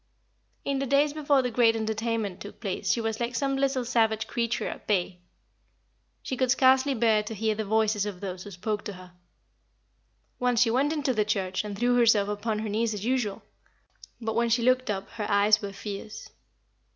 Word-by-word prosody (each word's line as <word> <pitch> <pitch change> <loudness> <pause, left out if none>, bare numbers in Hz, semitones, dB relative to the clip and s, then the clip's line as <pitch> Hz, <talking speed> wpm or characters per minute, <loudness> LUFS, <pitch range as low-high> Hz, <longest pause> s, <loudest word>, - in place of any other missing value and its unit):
In 275 -1 0
the 275 - -2
days 285 +2 +3
before 285 -3 +2
the 250 - -2
great 230 -1 +4
entertainment 220 -3 -2
took 205 - -10
place 195 -5 -2
she - - +1
was 225 -1 -2
like 240 +1 -2
some 275 +2 0
little 270 -2 0
savage 220 -2 +1
creature 235 0 -2
at - - -7
bay. 185 -3 0 1.0
She 260 - -3
could 255 0 0
scarcely 265 +1 +4
bear 220 -2 +3
to 210 +1 -7
hear 220 +1 0
the 215 0 -4
voices 215 -1 +1
of 195 -3 -6
those 185 -2 -5
who 205 - -9
spoke 205 +3 -3
to 205 - -5
her. 180 -1 -13 1.3
Once 245 -2 +2
she 230 -2 +4
went 275 +5 +2
into 290 -4 0
the 215 -2 +2
church 195 -3 -1
and 205 -1 -6
threw 245 +2 +2
herself 220 -4 +4
upon 210 +1 -2
her 215 +1 -3
knees 220 +1 0
as 205 +1 -5
usual, 240 -5 -1 0.8
but 225 -2 -3
when 235 0 +2
she 230 +1 +2
looked 255 0 +2
up 195 -1 -2
her 220 -3 -5
eyes 205 +1 +4
were 200 -1 -5
fierce. 205 +1 -8
220 Hz, 195 wpm, -27 LUFS, 205-250 Hz, 1.3 s, great